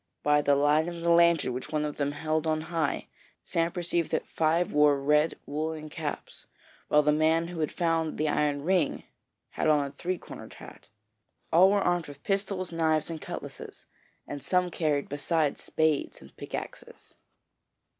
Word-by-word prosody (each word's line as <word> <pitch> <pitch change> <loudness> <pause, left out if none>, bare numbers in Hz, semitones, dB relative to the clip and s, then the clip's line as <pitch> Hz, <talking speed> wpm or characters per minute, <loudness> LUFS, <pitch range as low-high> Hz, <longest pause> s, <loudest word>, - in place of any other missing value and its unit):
By 150 0 +4
the 145 -1 +3
light 145 +3 +3
of 170 -1 -6
the 170 0 +2
lantern 170 -5 +4
which 125 - -6
one 150 -1 0
of 150 - -5
them 145 0 -1
held 155 +1 -1
on 155 0 +1
high, 160 -2 -2 0.4
Sam 165 0 0
perceived 175 -2 -1
that - - -1
five 165 +2 +1
wore 150 -1 +4
red 150 +3 +2
woollen 155 +1 -4
caps, 150 -2 -6 0.4
while 150 0 +4
the 150 - +3
man 160 +2 +2
who 175 -2 -7
had 155 - -1
found 165 -2 0
the 155 - 0
iron 145 -1 0
ring 175 -3 +1 0.5
had - - -1
on 150 -2 +3
a 140 - -6
three 175 +6 -3
cornered - - -11
hat. - - -13 0.6
All 180 +4 +7
were 200 0 +2
armed 175 -2 0
with 145 0 -12
pistols, 195 -2 -1
knives, 160 -1 +1
and 160 -1 -6
cutlasses, - - -8 0.4
and 145 -1 -7
some 180 +2 +1
carried, 150 -4 0
besides, 145 +1 0
spades 155 -2 0
and - - -16
pickaxes. - - -8
155 Hz, 170 wpm, -28 LUFS, 150-170 Hz, 0.6 s, All